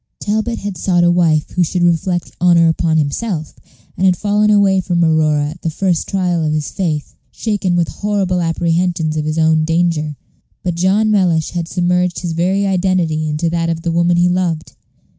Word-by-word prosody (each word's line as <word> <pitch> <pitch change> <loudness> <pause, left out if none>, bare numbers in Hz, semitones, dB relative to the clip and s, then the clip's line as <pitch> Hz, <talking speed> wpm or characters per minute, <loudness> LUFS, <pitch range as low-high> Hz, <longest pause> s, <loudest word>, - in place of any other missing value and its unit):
Talbot 220 +3 -2
had 200 -4 -6
sought 175 -1 +2
a 175 - +4
wife 165 -4 +1
who 180 - -1
should 175 +2 -1
reflect 175 +1 0
honor 170 -2 +5
upon 160 0 +1
himself, 155 +2 -2 0.4
and - - -3
had 185 -2 +3
fallen 210 0 +1
away 200 -2 +3
from 175 -2 0
Aurora 155 -2 +2
at 165 - -13
the 165 - -2
first 175 +1 -1
trial 180 -4 0
of 155 -1 0
his 155 -1 -2
faith, 155 -6 -3 0.2
shaken 205 -5 -1
with 170 -2 +1
horrible 195 -3 -1
apprehensions 165 -1 0
of 155 -1 -2
his 155 +1 -2
own 160 -1 +3
danger. 165 -2 0 0.5
But 180 - -1
John 195 +5 +1
Mellish 175 -6 +1
had 170 -2 -3
submerged 180 0 0
his 175 -2 -3
very 185 +5 0
identity 180 -5 0
into 150 +3 -1
that 165 -1 -1
of 165 0 -3
the 170 - -1
woman 170 +1 +2
he 175 +1 +3
loved. 175 -3 -1
175 Hz, 185 wpm, -16 LUFS, 160-185 Hz, 0.5 s, honor